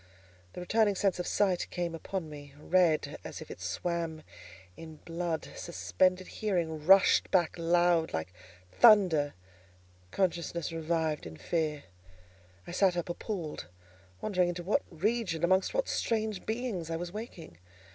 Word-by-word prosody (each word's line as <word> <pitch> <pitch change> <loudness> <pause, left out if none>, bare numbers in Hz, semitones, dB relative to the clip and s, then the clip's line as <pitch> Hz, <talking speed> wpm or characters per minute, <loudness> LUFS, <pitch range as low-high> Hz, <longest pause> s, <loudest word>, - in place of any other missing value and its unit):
The - - -7
returning 210 +2 +2
sense 190 -2 +1
of 180 - -3
sight 190 -4 +1
came 175 -2 -3
upon 165 +1 -4
me, 145 -2 -11
red, 170 0 +2
as - - -7
if - - -9
it - - -9
swam 160 - -3 0.5
in 160 -1 -10
blood; 165 0 -4
suspended 185 +1 0
hearing 170 -8 -2
rushed 195 0 +6
back 175 -4 +2
loud, 170 -1 +2
like 80 +3 -4 0.4
thunder; 180 - +5 0.7
consciousness 170 - -1
revived 160 - -1
in 80 -1 -10
fear: 155 - -2 0.8
I - - -8
sat 180 0 +2
up 175 - -3
appalled, 175 -3 -5 0.5
wondering 180 -4 +1
into 175 0 -4
what 210 +10 +1
region, 190 -1 -1
amongst 185 +2 +3
what - - 0
strange 220 -4 -1
beings 220 -8 -3
I 165 - -2
was 175 +1 -5
waking. 185 - -9
175 Hz, 135 wpm, -30 LUFS, 160-190 Hz, 0.8 s, rushed